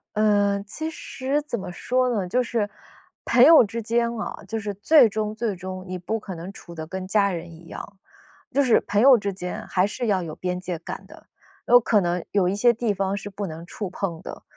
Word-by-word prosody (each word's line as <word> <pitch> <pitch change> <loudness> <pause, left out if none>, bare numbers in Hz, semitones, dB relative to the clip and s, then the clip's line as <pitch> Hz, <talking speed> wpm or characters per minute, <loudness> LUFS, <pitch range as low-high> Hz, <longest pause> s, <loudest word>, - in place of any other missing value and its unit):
呃， 205 -2 +3
其 315 +10 -5
实， 275 -1 -3
怎 240 -7 -4
么 185 -2 -6
说 250 +7 0
呢？ 195 -4 -1
就 250 +7 +1
是， 225 -4 -1 0.6
朋 245 +1 +5
友 315 -2 +9
之 230 +3 -4
间 235 +1 +1
啊， 215 - -5
就 225 -1 -3
是 205 -1 -4
最 240 +6 +6
终 215 0 -3
最 220 -3 -2
终 185 +1 -7
你 185 - -4
不 220 +5 -2
可 195 -3 -7
能 175 +4 -7
处 170 -3 -12
得 160 -1 -7
跟 190 +1 -5
家 200 -1 +2
人 170 -1 -6
一 165 +1 -14
样。 205 - -9 0.5
就 280 - +3
是 240 -4 +4
朋 205 - +1
友 265 0 +8
之 200 -1 -2
间 180 -1 -6
还 185 0 +2
是 235 +3 -3
要 190 -4 +1
有 155 -2 -6
边 180 0 -3
界 180 -3 -5
感 - - -7
的， - - -16 0.4
有 245 +1 +8
可 215 -3 +2
能 175 0 -1
有 190 -3 +2
一 195 - -1
些 235 +3 +4
地 225 -2 -1
方 195 +1 -1
是 205 0 -6
不 200 +1 -5
能 165 -1 -7
触 200 -1 -5
碰 175 -3 -4
的。 - - -9
205 Hz, 245 characters per minute, -24 LUFS, 185-235 Hz, 0.6 s, 友